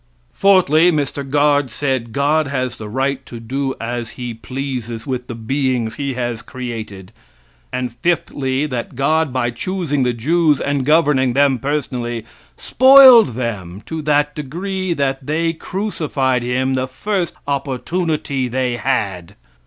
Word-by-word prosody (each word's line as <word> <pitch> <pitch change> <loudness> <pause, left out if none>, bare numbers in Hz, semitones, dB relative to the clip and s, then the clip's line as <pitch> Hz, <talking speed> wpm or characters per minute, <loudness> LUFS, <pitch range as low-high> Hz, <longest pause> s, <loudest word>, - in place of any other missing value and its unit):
Fourthly, 180 -4 +4
Mr. 145 -2 -2
Guard 145 -1 +2
said 130 -1 -2
God 145 +4 +1
has 130 -3 -2
the 105 -1 -7
right 135 +3 -1
to 120 - -8
do 130 +4 -3
as 120 0 -4
he 120 -2 -4
pleases 120 -2 -5
with 125 -2 -4
the 120 - -6
beings 125 -1 -1
he 140 -2 -3
has 120 -2 -3
created; 110 -7 -7 0.6
and, 125 -2 -3
fifthly, 140 -4 0
that 125 -4 -4
God, 155 +3 +1
by 120 -2 0
choosing 160 +1 -2
the 125 -1 +2
Jews 150 +6 +2
and 140 -2 -1
governing 150 -5 +3
them 135 -1 +3
personally, 125 -5 -3 0.3
spoiled 260 - +7
them 105 -6 -4
to 160 -1 -4
that 150 0 +1
degree 180 +6 -3
that 135 -3 -1
they 165 +2 0
crucified 155 - -2
Him 130 +2 0
the 130 0 -1
first 180 +6 -2
opportunity 140 0 -2
they 125 0 -1
had. 100 -8 -2
135 Hz, 135 wpm, -18 LUFS, 120-150 Hz, 0.6 s, spoiled